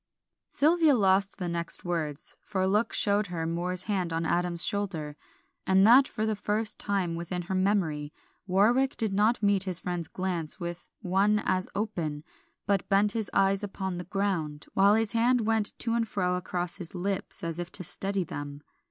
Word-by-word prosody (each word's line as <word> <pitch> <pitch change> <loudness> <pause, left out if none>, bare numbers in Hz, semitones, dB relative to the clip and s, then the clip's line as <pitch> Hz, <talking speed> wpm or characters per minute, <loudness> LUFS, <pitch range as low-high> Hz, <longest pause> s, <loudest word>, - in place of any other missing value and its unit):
Sylvia 315 -1 +3
lost 195 -2 +2
the 180 -3 -4
next 170 +1 0
words, 155 -4 -3
for 200 -3 -4
a 190 - +2
look 210 +4 +1
showed 205 0 +2
her 170 -2 -4
Moor's 175 +2 -2
hand 190 -5 -2
on 165 0 -1
Adam's 175 0 0
shoulder, 170 -8 -2 0.5
and 190 +1 +5
that 255 +5 +7
for 215 - -3
the 220 -1 0
first 210 +2 -1
time 195 -4 -1
within 170 +1 -4
her 190 +3 -5
memory 185 -7 0 0.4
Warwick 235 +9 +2
did 220 -4 0
not 215 +3 +2
meet 200 -1 +2
his 185 -3 +4
friend's 175 -3 -3
glance 180 -1 -4
with 175 -1 -6
one 195 +3 +2
as 185 0 0
open, 170 -8 -3 0.4
but 200 -2 0
bent 200 +1 +3
his 220 -1 -3
eyes 195 0 +2
upon 190 -2 -4
the 175 - -6
ground, 170 -6 -2
while 200 +2 +5
his 220 -2 +1
hand 235 +2 +2
went 220 -1 +1
to 230 - -1
and 230 -1 0
fro 180 -3 -1
across 180 0 -3
his 180 -1 -7
lips 190 +1 -1
as 165 0 -3
if 175 0 -5
to 185 - -2
steady 195 +3 0
them. 145 -2 -7
190 Hz, 180 wpm, -28 LUFS, 175-205 Hz, 0.5 s, that